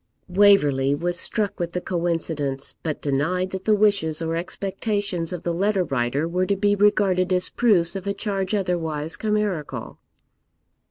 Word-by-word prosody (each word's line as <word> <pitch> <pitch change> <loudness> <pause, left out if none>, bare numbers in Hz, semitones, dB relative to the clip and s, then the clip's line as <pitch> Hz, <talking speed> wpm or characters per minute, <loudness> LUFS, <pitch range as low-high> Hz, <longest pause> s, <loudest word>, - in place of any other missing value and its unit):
Waverley 150 -9 +4
was 175 +3 -2
struck 210 -3 -1
with 170 0 -3
the 180 - -1
coincidence, 165 -6 -2
but 155 -3 -4
denied 170 +7 0
that 190 0 -6
the 215 - +4
wishes 200 -7 +2
or 165 0 -2
expectations 195 0 -2
of 180 -2 -5
the 170 - -1
letter 195 +2 +1
writer 135 +1 -1
were 180 +2 0
to 200 - +2
be 205 +1 +2
regarded 200 -3 +2
as 180 0 +1
proofs 195 -7 +2
of 195 0 -5
a 200 - 0
charge 200 -1 -2
otherwise 165 -5 -1
chimerical. 210 -8 -2
180 Hz, 155 wpm, -23 LUFS, 160-200 Hz, -, Waverley